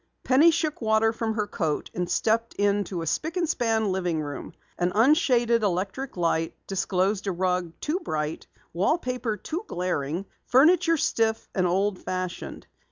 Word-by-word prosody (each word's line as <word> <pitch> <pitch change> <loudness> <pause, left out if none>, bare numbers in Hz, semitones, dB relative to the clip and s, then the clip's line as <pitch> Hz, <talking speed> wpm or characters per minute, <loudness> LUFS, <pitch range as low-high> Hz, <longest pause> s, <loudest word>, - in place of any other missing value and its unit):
Penny 280 +6 +6
shook 310 -3 -1
water 220 0 +3
from 225 -1 -2
her 210 -2 0
coat 160 -6 -2
and 180 -1 -2
stepped 230 +1 +1
into 200 -3 0
the - - -4
spic 320 - -2
and 345 -2 +1
span 225 -7 +1
living 180 -4 -1
room. 145 -3 -6 0.3
An 175 +1 +1
unshaded 240 - +4
electric 195 +6 -2
light 165 -1 0
disclosed 195 +1 0
a - - +1
rug 180 -1 -1
too 315 +5 -1
bright, 155 - -3 0.3
wallpaper 250 - 0
too 330 - -5
glaring, 175 -1 -2 0.2
furniture 330 +5 +5
stiff 225 -5 0
and 185 -2 +1
old 190 +2 0
fashioned. 185 -1 -5
205 Hz, 150 wpm, -26 LUFS, 180-245 Hz, 0.3 s, Penny